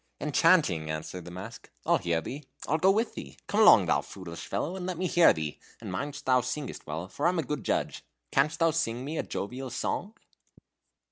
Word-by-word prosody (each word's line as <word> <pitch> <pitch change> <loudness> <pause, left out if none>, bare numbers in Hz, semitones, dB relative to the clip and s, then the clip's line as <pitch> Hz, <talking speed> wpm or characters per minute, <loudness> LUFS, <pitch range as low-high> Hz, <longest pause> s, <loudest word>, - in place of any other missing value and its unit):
"Enchanting!" 150 - +3
answered 80 +3 -5
the - - -8
mask. 90 +2 -9 0.2
"I'll - - +3
hear 85 -1 0
thee: 140 - -7 0.2
I'll 155 - +1
go 185 - +5
with 220 +4 +2
thee. 70 - -9
Come - - 0
along, - - +8
thou - - +2
foolish 85 -3 -9
fellow, 145 - -2
and 185 -1 -5
let 185 -2 -3
me 185 - -1
hear 175 -1 +6
thee, 75 -2 -4 0.2
and - - -7
mind 140 +10 -4
thou 130 -1 +4
singest 130 +3 -5
well, 80 +4 -4
for 145 - -1
I - - +5
am 180 - -1
a 165 - +1
good 150 +2 -4
judge. - - -1 0.3
Canst 150 +3 +2
thou 165 -1 +3
sing 130 -6 -1
me 155 +2 -3
a - - 0
jovial 125 +6 -5
song?" 200 - -3
135 Hz, 210 wpm, -29 LUFS, -, 0.3 s, along